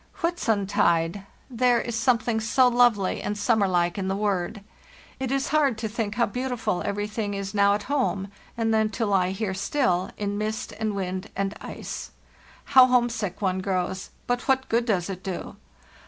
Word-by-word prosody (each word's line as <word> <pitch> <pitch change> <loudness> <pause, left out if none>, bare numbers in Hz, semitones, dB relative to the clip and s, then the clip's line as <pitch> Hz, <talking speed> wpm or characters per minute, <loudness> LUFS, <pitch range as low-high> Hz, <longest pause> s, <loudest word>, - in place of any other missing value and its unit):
"Whitsuntide! 200 - +1
— - - -32
there 245 -1 +2
is 235 -1 -3
something 230 -1 +2
so 250 +4 +3
lovely 240 -6 +3
and 205 0 -3
summer 210 -1 +2
like 175 0 +1
in 190 - -2
the 190 - 0
word. 200 0 -1 0.6
It 265 -1 -2
is 275 0 0
hard 285 -6 +2
to 220 0 -2
think 215 -1 -3
how 235 +1 +3
beautiful 245 -5 -2
everything 205 0 -2
is 195 0 -4
now 200 0 +4
at 205 - -4
home, 255 -9 -1 0.3
and 225 -1 +1
then 220 -1 +3
to 220 -4 0
he 180 +1 0
here 195 0 -2
still, 190 -2 0
in 205 0 -2
mist 215 +1 -3
and 215 -2 -1
wind 185 +1 -3
and 195 +1 -1
ice. - - -6 0.6
How 260 -2 +7
homesick 235 -6 0
one 190 -1 +1
grows; 185 0 -2 0.2
but 245 +1 -1
what 265 -1 +2
good 230 +1 +2
does 190 -7 0
it 190 -2 -6
do? 190 -2 -6
210 Hz, 175 wpm, -25 LUFS, 195-240 Hz, 0.6 s, How